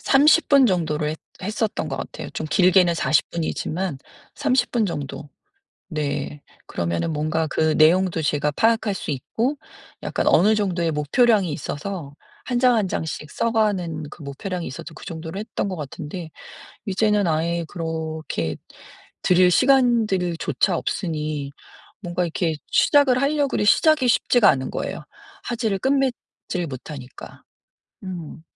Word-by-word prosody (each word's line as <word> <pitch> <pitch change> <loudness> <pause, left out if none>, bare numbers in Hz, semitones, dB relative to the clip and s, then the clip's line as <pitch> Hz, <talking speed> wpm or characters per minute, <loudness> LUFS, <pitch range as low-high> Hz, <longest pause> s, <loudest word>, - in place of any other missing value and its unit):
30 300 +4 +4
분 275 -3 +6
정도로 160 -5 0
했 155 +1 -4 0.2
했었던 210 +2 -2
것 - - -4
같아요. - - -7
좀 155 - -4
길게는 180 -1 +4
40 155 -3 +2
분이지만 170 -1 -3 0.4
30 265 -2 +1
분 230 -3 +1
정도. 145 -3 -5 0.6
네. 145 -3 -3 0.2
그러면은 85 - -2
뭔가 155 +2 0
그 155 +1 +1
내용도 170 +2 +4
제가 150 -1 0
파악할 225 +6 +2
수 190 - -4
있고 230 - -2 0.5
약간 - - -2
어느 210 +4 +5
정도의 180 -5 0
목표량이 185 - +2
있어서 145 +1 -5 0.3
1 245 -1 -1
장 250 -1 +5
1 210 -4 +1
장씩 155 -3 -4
써 230 +8 -1
가는 190 -8 0
그 165 - -12
목표량이 170 +6 -5
있어서 130 +5 -8
그 - - -11
정도로 165 +1 -6
했던 210 -1 -3
것 185 - -4
같은데 155 +3 -7 0.6
이제는 205 0 +2
아예 165 +1 0
그렇게 160 - -4 0.7
들일 180 0 +5
시간들조차 205 - +2
없으니 150 -7 -3 0.5
뭔가 175 -2 -2
이렇게 165 -1 -1 0.2
시작을 265 -3 +4
할려 285 0 +2
그래 210 - -1
시작이 300 +4 +4
쉽지가 240 -2 +4
않은 130 -1 0
거예요 - - -4 0.4
화제를 225 -4 -1
끝맺질 260 -8 -1
못하니까. 130 -1 -9 0.6
음. 175 -5 -7
175 Hz, 275 characters per minute, -23 LUFS, 155-215 Hz, 0.7 s, 분